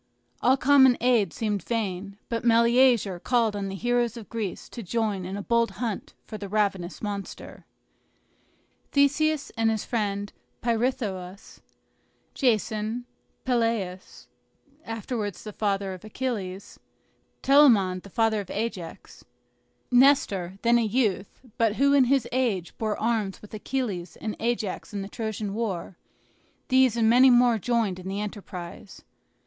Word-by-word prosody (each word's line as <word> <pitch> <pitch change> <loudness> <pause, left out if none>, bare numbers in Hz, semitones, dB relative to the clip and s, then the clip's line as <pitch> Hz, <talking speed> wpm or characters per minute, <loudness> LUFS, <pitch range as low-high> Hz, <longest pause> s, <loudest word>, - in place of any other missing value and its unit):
All 260 +2 +4
common 265 -2 +5
aid 240 -4 +2
seemed 210 -3 -2
vain; 200 -3 -3
but 230 -1 -3
Meleager 235 -4 +4
called 230 0 +1
on 200 -1 -3
the 195 - -5
heroes 240 +2 0
of 225 - -10
Greece 215 -5 -4
to 235 - -8
join 210 -2 -2
in 190 +2 -5
a 205 - -5
bold 235 +1 +2
hunt 230 -5 -4
for 215 - -8
the 200 - -6
ravenous 195 -3 -1
monster. 200 -2 -6 1.3
Theseus 290 +1 +2
and 225 -1 +2
his 220 -2 -1
friend 205 -3 -2 0.3
Pirithous, 220 -6 -2 0.7
Jason, 220 -1 0 0.4
Peleus, 230 -7 -2 0.6
afterwards 225 -3 -4
the 215 - -8
father 200 -2 -1
of 185 - -11
Achilles, 210 -5 -5 0.6
Telamon 230 -10 +5
the 200 - -13
father 225 0 +1
of 195 - -11
Ajax, 200 -6 -5 0.7
Nestor, 245 -9 +3
then 235 0 +4
a - - +1
youth, 215 -3 -1 0.2
but 225 -2 +2
who 280 +3 +3
in 275 -2 +5
his 260 -1 +2
age 230 -9 -1
bore 215 -2 -1
arms 220 -4 -1
with 210 - -15
Achilles 215 -5 -3
and 215 - -4
Ajax 225 -2 -3
in 200 - -2
the - - -6
Trojan 215 -2 -4
war, 200 -5 -3 0.7
these 260 -3 +4
and 225 -1 +3
many 250 +3 +7
more 240 -2 +5
joined 220 -4 0
in 185 - -9
the 195 +1 -3
enterprise. 195 -3 -8
220 Hz, 135 wpm, -26 LUFS, 200-240 Hz, 1.3 s, many